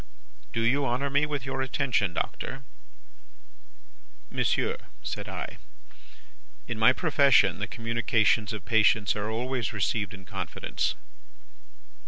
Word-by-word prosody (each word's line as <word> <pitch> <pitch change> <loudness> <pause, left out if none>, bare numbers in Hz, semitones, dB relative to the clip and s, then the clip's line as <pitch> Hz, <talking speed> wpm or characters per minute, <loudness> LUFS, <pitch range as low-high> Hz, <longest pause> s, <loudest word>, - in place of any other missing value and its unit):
"'Do 115 - -1
you 130 +5 +2
honour 135 +2 0
me 145 +2 +3
with 145 -4 -3
your 135 0 -2
attention, 130 -7 0
Doctor?' 135 +9 -4 1.7
"'Monsieur,' - - 0 0.2
said - - -4
I, - - -6 1.1
'in 120 -2 -4
my 110 +3 +7
profession, 140 -2 +4
the - - -2
communications 115 -1 +1
of 105 -3 -6
patients 110 -2 +3
are 105 0 -2
always 120 0 -2
received 100 -1 -1
in 95 -1 -13
confidence. 95 -4 -3
115 Hz, 115 wpm, -28 LUFS, 105-135 Hz, 1.7 s, my